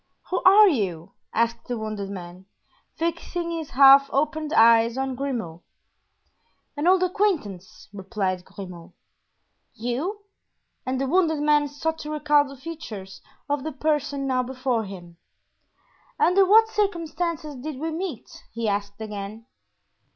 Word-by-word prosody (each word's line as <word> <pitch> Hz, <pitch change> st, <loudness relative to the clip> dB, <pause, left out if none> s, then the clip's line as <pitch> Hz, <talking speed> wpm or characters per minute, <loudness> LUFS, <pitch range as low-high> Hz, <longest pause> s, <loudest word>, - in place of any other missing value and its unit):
"Who 365 Hz, -, 0 dB
are 410 Hz, +3 st, +8 dB
you?" 190 Hz, -, -1 dB, 0.2 s
asked 230 Hz, +1 st, -1 dB
the 245 Hz, -, -3 dB
wounded 215 Hz, -2 st, -5 dB
man, 185 Hz, -1 st, -9 dB, 0.5 s
fixing 340 Hz, +1 st, -3 dB
his 325 Hz, -3 st, -4 dB
half 275 Hz, +1 st, +7 dB
opened 305 Hz, +2 st, -1 dB
eyes 230 Hz, -1 st, +5 dB
on 265 Hz, 0 st, -1 dB
Grimaud. 240 Hz, -11 st, -4 dB, 1.1 s
"An 295 Hz, +3 st, -1 dB
old 370 Hz, 0 st, +5 dB
acquaintance," 345 Hz, -, -2 dB
replied 195 Hz, -2 st, -3 dB
Grimaud. 180 Hz, -2 st, -10 dB, 0.8 s
"You?" 260 Hz, -, -3 dB, 0.7 s
and 255 Hz, 0 st, -1 dB
the 270 Hz, -, 0 dB
wounded 320 Hz, 0 st, +2 dB
man 295 Hz, 0 st, +3 dB
sought 320 Hz, +3 st, -3 dB
to 300 Hz, -, -7 dB
recall 300 Hz, -1 st, +3 dB
the 275 Hz, 0 st, -11 dB
features 240 Hz, -11 st, -8 dB, 0.3 s
of 285 Hz, -2 st, -1 dB
the 315 Hz, -, -3 dB
person 285 Hz, -1 st, -1 dB
now 255 Hz, -1 st, +1 dB
before 255 Hz, -2 st, -2 dB
him. 175 Hz, -3 st, -11 dB, 1.0 s
"Under 380 Hz, +2 st, +4 dB
what 445 Hz, +3 st, +6 dB
circumstances 340 Hz, -7 st, -2 dB
did 275 Hz, +2 st, -6 dB
we 320 Hz, +4 st, -3 dB
meet?" 325 Hz, -, -6 dB
he 230 Hz, 0 st, -3 dB
asked 200 Hz, 0 st, -2 dB
again. 210 Hz, +1 st, -7 dB
270 Hz, 130 wpm, -24 LUFS, 215-320 Hz, 1.1 s, are